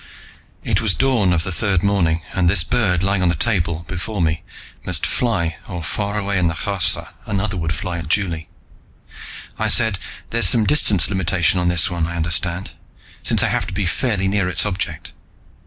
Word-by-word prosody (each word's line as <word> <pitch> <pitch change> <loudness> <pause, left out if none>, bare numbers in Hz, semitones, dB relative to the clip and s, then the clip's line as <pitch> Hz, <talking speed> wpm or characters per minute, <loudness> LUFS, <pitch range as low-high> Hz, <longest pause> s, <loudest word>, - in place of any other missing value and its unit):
It - - +1
was 110 -4 +2
dawn 125 -8 +2
of 85 -2 +1
the 95 - -2
third 95 0 0
morning, 85 -5 +1
and 90 -2 +2
this 95 -2 +4
bird 95 -6 +1
lying 100 0 +1
on 90 - +3
the 85 - +1
table 85 -3 -1
before 95 +3 -4
me 80 -2 0 0.4
must - - +1
fly 85 -10 -1
or, 90 -3 -6
far 100 +6 -2
away 100 -2 -1
in 90 - +2
the 80 - -2
Kharsa, 95 0 0 0.2
another 100 +1 -1
would 80 -2 -2
fly 90 -3 -4
at 80 - -6
Juli. 85 -3 -1 1.1
I - - +1
said, 110 -4 +3 0.3
"There's 115 -4 +4
some 115 -3 +4
distance 105 - +4
limitation 90 -2 +1
on 90 - 0
this 85 0 +3
one, 85 -2 -1
I 85 - -5
understand, 85 +2 -1 0.5
since - - +2
I - - +2
have - - -1
to - - -7
be 100 0 -1
fairly 95 +2 0
near 95 -2 +1
its 85 0 +1
object. 100 -3 -4
90 Hz, 190 wpm, -20 LUFS, 85-100 Hz, 1.1 s, this